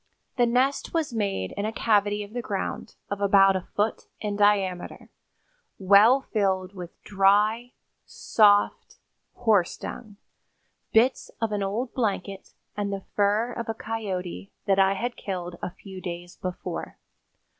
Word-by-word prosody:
The 245 -2 +3
nest 260 +7 +1
was 310 -6 0
made 200 - -2
in 200 - -4
a 215 - -1
cavity 205 -2 +1
of 205 +1 -12
the 245 - -2
ground, 200 -4 -4 0.2
of 200 0 -3
about 195 -1 +5
a 190 - -1
foot 210 +2 -1
in 210 -1 -3
diameter, 200 -3 0 0.7
well 205 +7 +6
filled 190 -5 -1
with 180 -3 -9
dry, 210 +5 +2 0.3
soft 205 -2 +2 0.4
horse 215 -7 +2
dung, 215 -4 -8 0.8
bits 245 +4 +3
of 225 -2 -1
an 205 -1 -1
old 215 +6 -2
blanket 200 -5 -3 0.2
and 205 -1 -2
the 195 -1 -4
fur 210 +4 +2
of 235 -1 -5
a 225 - -1
coyote 200 -5 -5
that 195 -1 +2
I 195 0 +4
had 240 +4 -3
killed 180 -3 -5
a - - -3
few 190 +1 -11
days 175 -1 -7
before. 180 -1 -6
205 Hz, 145 wpm, -26 LUFS, 195-225 Hz, 0.8 s, well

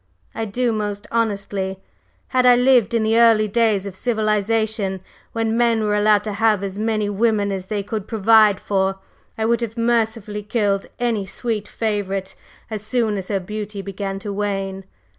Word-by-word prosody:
"I 225 - -3
do, 240 +3 0
most 205 -2 -3
honestly. 200 -4 -1 0.5
Had 255 -1 +2
I 250 -1 +7
lived 245 -2 +4
in 225 - +2
the 220 +1 +3
early 225 -2 +5
days 210 -2 +1
of 195 -2 -6
civilization, 215 -3 0 0.3
when 225 -1 -1
men 230 -2 +2
were 210 -1 +1
allowed 210 0 +3
to 210 -1 -4
have 210 -1 +2
as 195 0 -4
many 215 -1 0
women 205 0 +1
as 190 -1 -4
they 205 -1 -2
could 210 0 -5
provide 215 -1 +4
for, 195 -1 0 0.4
I 220 - 0
would 235 +1 +2
have 230 0 -4
mercifully 225 -3 0
killed 205 -2 0
any 225 -5 -1
sweet 215 0 -3
favorite 200 -4 -2 0.4
as 215 -2 -3
soon 220 -1 0
as 190 -2 -4
her 200 -2 0
beauty 210 +1 -6
began 195 0 -4
to 205 -2 -4
wane. 195 -1 -3
210 Hz, 170 wpm, -21 LUFS, 200-225 Hz, 0.5 s, I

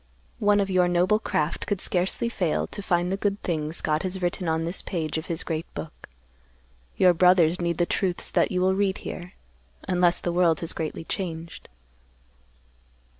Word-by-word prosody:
One 205 0 +4
of 195 -1 0
your 180 -1 +4
noble 180 +4 +3
craft 150 -7 -2
could 205 - -1
scarcely 185 +5 0
fail 180 -8 0
to 205 - -6
find 175 -1 0
the 195 - 0
good 200 0 -1
things 155 -2 -2
God 155 0 0
has 190 0 -3
written 175 -1 -1
on 160 0 0
this 170 +3 -4
page 160 -5 -3
of 160 - -9
His 165 -2 -1
great 160 -1 -4
book. 155 - -8 0.9
Your 180 -1 +6
brothers 180 0 +4
need 170 -1 0
the 175 - +2
truths 180 0 -1
that - - +2
you 180 -1 0
will 190 +1 +3
read 195 0 +1
here; 180 0 -6 0.5
unless 175 -1 +3
the 175 - -2
world 170 -3 +3
has 165 - 0
greatly 160 0 -4
changed." 165 -2 -5
175 Hz, 175 wpm, -25 LUFS, 165-190 Hz, 0.9 s, Your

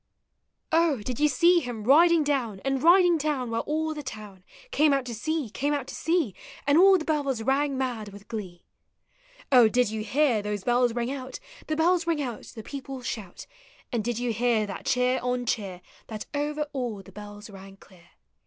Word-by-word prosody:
On, 325 -5 +3
did 245 +3 -5
you 300 - +4
see 340 +6 +4
him 245 -7 -6
riding 325 +6 +5
down. 255 -9 -1
And 270 -1 0
riding 345 0 +5
down, 280 -5 -2
while 230 - 0
all 315 +1 -1
the 300 - -6
town 210 -8 -9 0.3
Came 300 -5 +3
out 275 -2 0
to 240 - -5
see, 295 +1 -3
came 290 +5 -1
out 280 -3 -3
to - - -9
see, 325 - 0 0.3
And 285 +1 +3
all 380 +3 +7
the 315 - -5
bells 280 -7 -1
rang 275 +2 +1
mad 245 -5 -3
with 200 +1 -13
glee? 185 -6 -7 0.9
Oh, 245 -4 +7
did 245 -1 +1
you 220 -1 -3
hear 250 0 +2
those 205 -1 -4
bells 245 -1 +2
ring 240 +1 -1
out, 265 - -6 0.3
The 310 - -1
bells 345 +2 +2
Hug 335 -2 0
out. 245 -6 -4
the 220 - -8
people 270 -1 -7
shout. 205 -7 -6 0.5
And 235 -4 -1
did 240 0 -2
you 240 -1 -1
hear 230 -1 +1
that 195 -2 -7
cheer 250 0 +2
on 250 0 -1
cheer 195 -6 -3 0.3
That 215 -2 -6
over 295 +1 -1
all 240 -7 -4
the 195 - -15
bells 205 +2 -10
rang 195 0 -12
clear? 180 -3 -20
250 Hz, 195 wpm, -26 LUFS, 220-295 Hz, 0.9 s, all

